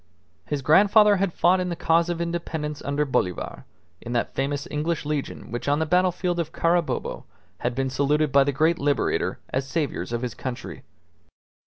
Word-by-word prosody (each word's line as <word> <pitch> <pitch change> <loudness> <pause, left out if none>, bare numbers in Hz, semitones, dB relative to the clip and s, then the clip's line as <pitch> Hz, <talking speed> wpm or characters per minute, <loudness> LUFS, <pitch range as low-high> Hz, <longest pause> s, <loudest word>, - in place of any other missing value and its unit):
His 145 -2 -2
grandfather 205 - +6
had 195 -1 0
fought 180 +3 +3
in 180 0 -1
the 170 - -2
cause 165 +1 +2
of 170 -1 -2
independence 165 -3 -3
under 145 +1 -1
Bolivar, 90 -9 -2 0.4
in 120 - -6
that 120 - -1
famous 140 +1 -2
English 155 +1 -2
legion 145 -6 -4
which 120 +2 -4
on 145 +1 +3
the 160 - 0
battlefield 180 +1 +1
of 160 -2 -2
Carabobo 170 -1 0 0.3
had 120 0 -2
been 135 0 -1
saluted 145 +2 +1
by 140 0 +6
the 145 - 0
great 160 +5 +2
Liberator 145 0 0
as 135 +1 -2
Saviours 150 -5 -2
of 120 +1 -2
his 120 -3 -3
country. 130 -2 -6
150 Hz, 175 wpm, -24 LUFS, 135-170 Hz, 0.4 s, grandfather